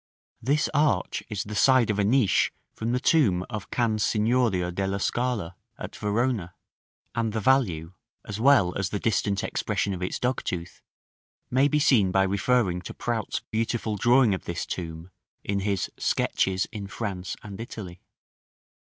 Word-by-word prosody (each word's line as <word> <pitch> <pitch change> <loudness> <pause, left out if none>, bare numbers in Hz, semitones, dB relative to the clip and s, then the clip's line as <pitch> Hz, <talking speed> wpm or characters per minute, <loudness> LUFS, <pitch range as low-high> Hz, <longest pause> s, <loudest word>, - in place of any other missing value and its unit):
This 145 +6 +1
arch 145 +1 +1
is 105 -3 -2
the 105 - -7
side 125 +1 +4
of 105 - -2
a - - +3
niche 115 0 +3 0.2
from 115 +1 -3
the 125 - +1
tomb 110 - +3
of 105 -1 -5
Can 115 -3 0
Signorio 105 -4 +1
della 95 +1 -1
Scala, 110 -7 -1 0.2
at - - -7
Verona; 105 -4 -1 0.6
and 115 -2 -1
the 110 - 0
value, 95 -10 +1 0.3
as 105 0 -5
well 115 -8 +4
as 95 -2 -1
the 100 - -2
distant 100 -2 0
expression 100 - -1
of 90 - -6
its 90 - -2
dogtooth, 90 -9 -3 0.7
may 130 +3 +4
be 150 - +1
seen 115 -10 +4
by 95 +1 +3
referring 100 -1 +1
to - - -8
Prout's 115 -3 -2
beautiful 110 -1 -1
drawing 120 +1 +4
of 95 - -4
this 85 0 -3
tomb 85 0 -6 0.3
in 100 0 -1
his 100 -2 -1
"Sketches 95 0 +1
in 105 -4 -6
France 95 -3 -4
and 100 -1 -8
Italy." 95 -6 -8
105 Hz, 155 wpm, -26 LUFS, 95-120 Hz, 0.7 s, side